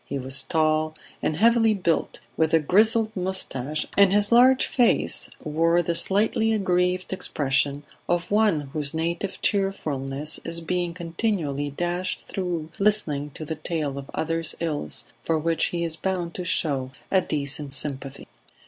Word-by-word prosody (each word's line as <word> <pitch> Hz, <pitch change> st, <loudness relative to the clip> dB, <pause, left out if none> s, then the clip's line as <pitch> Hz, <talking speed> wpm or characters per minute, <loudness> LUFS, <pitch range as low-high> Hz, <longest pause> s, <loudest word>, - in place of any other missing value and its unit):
He 140 Hz, -, -4 dB
was 135 Hz, +1 st, -1 dB
tall 155 Hz, +2 st, +1 dB, 0.3 s
and 155 Hz, -, 0 dB
heavily 225 Hz, 0 st, +4 dB
built, 170 Hz, -4 st, -1 dB
with 160 Hz, 0 st, +2 dB
a -, -, +5 dB
grizzled 215 Hz, -, +3 dB
moustache, 155 Hz, -7 st, -2 dB
and 200 Hz, -2 st, +6 dB
his 205 Hz, +1 st, +3 dB
large 255 Hz, +2 st, +6 dB
face 245 Hz, -3 st, +2 dB
wore 165 Hz, +3 st, +2 dB
the 170 Hz, -, 0 dB
slightly 210 Hz, +5 st, +2 dB
aggrieved 180 Hz, -2 st, +1 dB
expression 140 Hz, -4 st, 0 dB, 0.3 s
of 175 Hz, +1 st, 0 dB
one 210 Hz, -7 st, +3 dB
whose 150 Hz, 0 st, -2 dB
native 170 Hz, +4 st, -2 dB
cheerfulness 155 Hz, -8 st, -1 dB
is 165 Hz, 0 st, -3 dB
being 175 Hz, 0 st, -2 dB
continually 165 Hz, -5 st, -2 dB
dashed 175 Hz, +5 st, -3 dB
through 175 Hz, -5 st, -3 dB
listening 165 Hz, -9 st, +1 dB
to 155 Hz, -, -6 dB
the 160 Hz, -, -3 dB
tale 155 Hz, -3 st, -3 dB
of 135 Hz, -, -10 dB
others' 165 Hz, 0 st, -1 dB
ills 150 Hz, -, -3 dB, 0.2 s
for 165 Hz, -, 0 dB
which 165 Hz, +1 st, +1 dB
he 170 Hz, -1 st, -2 dB
is 165 Hz, -1 st, -2 dB
bound 175 Hz, -1 st, -2 dB
to 180 Hz, -, -5 dB
show 140 Hz, -7 st, 0 dB, 0.2 s
a 190 Hz, -, +4 dB
decent 145 Hz, -2 st, -3 dB
sympathy. 135 Hz, -1 st, -3 dB
165 Hz, 150 wpm, -25 LUFS, 150-190 Hz, 0.3 s, and